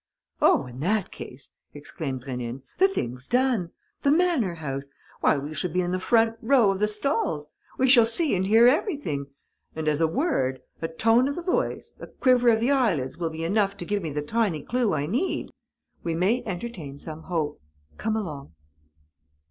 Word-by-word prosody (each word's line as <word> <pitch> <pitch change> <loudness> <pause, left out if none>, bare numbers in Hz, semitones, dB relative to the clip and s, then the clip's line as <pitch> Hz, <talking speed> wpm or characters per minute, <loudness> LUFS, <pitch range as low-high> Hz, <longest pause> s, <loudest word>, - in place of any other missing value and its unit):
"Oh, 140 - +4
in 125 0 -10
that 200 +5 0
case," 130 +1 -10 0.2
exclaimed 140 -3 -5
Rénine, 125 -1 -5 0.2
"the 380 - +7
thing's 125 - -4
done! 245 -8 +1 0.3
The 280 - +2
manor 305 - +2
house! 140 -3 -5 0.3
Why, - - +3
we 145 +3 -5
shall 180 +3 -1
be 180 - +1
in 175 0 -2
the 185 - 0
front 225 +2 +2
row 240 -4 +4
of 190 - -3
the 210 - +3
stalls! 210 - -1 0.3
We 260 - +3
shall 240 -3 +7
see 295 +7 +1
and 190 +1 0
hear 225 +3 +6
everything; 275 - 0 0.5
and, 160 -1 -3
as 150 +1 +1
a 165 - +4
word, 160 - 0 0.2
a 165 - -1
tone 225 +10 +3
of 280 - -2
the 350 - -5
voice, 360 - -1
a - - -8
quiver 250 -2 +3
of 225 -1 +4
the 240 +5 +2
eyelids 195 - +1
will 165 -2 -1
be 160 0 -6
enough 200 +3 +1
to 175 - -6
give 205 +2 -1
me 165 - -3
the 150 0 -3
tiny 195 -3 0
clue 245 -3 0
I 145 -1 -1
need, 250 - -1 0.5
we 165 -1 -2
may 195 +9 +2
entertain 175 -7 -5
some 155 +2 -8
hope. 160 -4 -3 0.4
Come 220 - -1
along." 150 - -5
185 Hz, 190 wpm, -26 LUFS, 150-240 Hz, 0.5 s, the